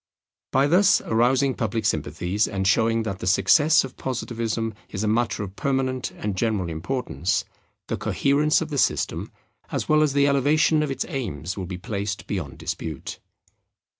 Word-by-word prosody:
By 135 +1 +3
thus 180 +7 +5
arousing 130 +4 +2
public 115 -1 -2
sympathies 95 +4 0
and 95 -1 -2
showing 115 +2 +3
that 100 -3 -4
the - - -5
success 145 - +5
of 135 - -9
Positivism 115 -3 -3 0.2
is 100 +1 -4
a - - 0
matter 115 0 0
of 95 -1 -8
permanent 130 -2 -1
and 105 -2 -3
general 100 -4 0
importance, 90 0 -2 0.4
the - - -3
coherence 150 +3 +2
of 160 - -3
the 145 -3 -1
system - - 0 0.4
as - - -2
well 155 0 +4
as 150 -3 +2
the 140 0 +4
elevation 150 +3 +3
of 150 - -1
its 135 - -2
aims 90 - -4
will 95 -3 -5
be 90 0 -5
placed 100 0 -4
beyond 75 -10 -4
dispute. 80 -4 -5
115 Hz, 165 wpm, -24 LUFS, 100-140 Hz, 0.4 s, thus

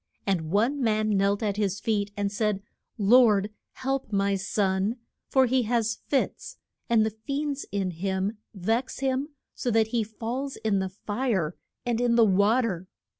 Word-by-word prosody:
And 170 -5 0
one 235 - +1
man 215 -2 +2
knelt 200 +2 +2
at 205 -2 -1
his 200 -2 0
feet 205 -2 0
and 200 -1 0
said, 210 -2 -1 0.3
Lord, 210 -2 +5 0.2
help 270 -2 -2
my 200 0 +2
son, 190 +2 0 0.3
for 265 -1 +4
he 255 +1 +2
has 230 -2 +1
fits, 275 - -1 0.3
and 225 -2 +4
the 220 - -1
fiends 280 +6 -3
in 195 -2 -1
him 190 +4 -2
vex 225 +8 -2
him 265 +1 0 0.3
so 245 - -2
that 220 -1 +3
he 230 -1 +1
falls 235 +6 -4
in 215 -3 0
the 190 0 -2
fire 205 -4 -2 0.3
and 240 -1 0
in 240 -1 +3
the 230 -1 +6
wa 205 +5 +4
ter. 185 -6 -3
215 Hz, 165 wpm, -27 LUFS, 200-240 Hz, 0.3 s, the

